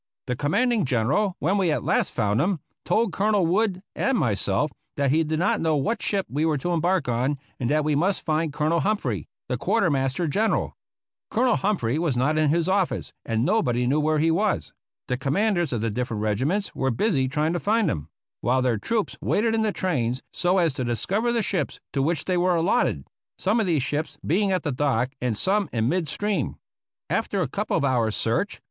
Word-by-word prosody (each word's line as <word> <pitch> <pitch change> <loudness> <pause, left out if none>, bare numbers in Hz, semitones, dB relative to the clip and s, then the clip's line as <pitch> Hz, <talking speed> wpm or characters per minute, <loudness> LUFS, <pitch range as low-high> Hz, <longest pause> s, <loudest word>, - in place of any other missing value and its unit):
The 125 - -2
com 145 +4 -2
manding 240 -2 +2
General, 140 - +1
when 190 +7 +1
we 180 -4 +2
at 150 - -1
last - - 0
found 105 +1 +1
him, 180 +1 0 0.3
told 215 +3 +1
Col 215 +2 +1
onel 195 -4 +3
Wood 185 +1 +1
and 270 -2 +1
myself 105 - 0 0.3
that 140 -2 +2
he 160 +3 +3
did 155 0 -1
not 175 - +1
know 160 -1 +2
what 150 +12 -1
ship 195 -2 0
we 145 +4 -1
were 160 -2 +2
to 175 +6 -2
embark 170 -2 +1
on, 125 +4 0 0.2
and 120 - -1
that 155 +1 +2
we 155 0 +1
must 180 +7 0
find 155 0 0
Colonel 155 +3 +1
Humphrey, 140 - -1 0.2
the - - -2
Quartermaster 135 +4 +1
General. 215 +9 0 0.5
Colonel 245 +1 +2
Hum 205 +1 +1
phrey 120 +4 -1
was 160 -7 0
not 150 +5 +2
in 155 -1 +3
his 165 +2 +1
office, 190 -1 0
and 115 +1 0
nobody 125 - +1
knew 140 +5 +2
where 155 +1 +2
he 160 +2 +3
was. 200 +5 0 0.3
The 125 - -1
commanders 175 +4 +1
of 120 -4 -1
the 115 -1 -1
different 115 -2 -3
regiments 140 - 0
were 135 - 0
busy 135 - +1
trying 150 +4 0
to 175 - -1
find 220 +2 +2
him, 75 -1 -2 0.3
while 130 +1 +1
their 120 -4 +1
troops 220 - -1
waited 225 +2 +1
in 225 - +1
the 215 -1 +1
trains, 130 -11 -1
so 180 +2 +1
as 170 -5 +2
to 130 - -3
discover 190 - 0
the 235 -2 +1
ships 180 -8 -2
to 140 - +1
which 155 +2 0
they 185 -1 +1
were 180 0 +2
allot 175 +9 +2
ted 70 -3 -4 0.2
— - - -71
^some 210 +5 +2
of 220 - +1
these 155 -7 +2
ships 150 +3 -3
being 195 +4 +2
at 185 - 0
the 150 - -1
dock 130 -2 0
and 120 -4 -1
some 200 - +1
in 115 -1 0
mid 170 +2 0
stream. 205 -9 -1 0.5
After - - 0
a - - -2
couple - - -1
of - - +1
hours' 120 -5 +1
search. 115 - -1
155 Hz, 215 wpm, -25 LUFS, 130-195 Hz, 0.5 s, onel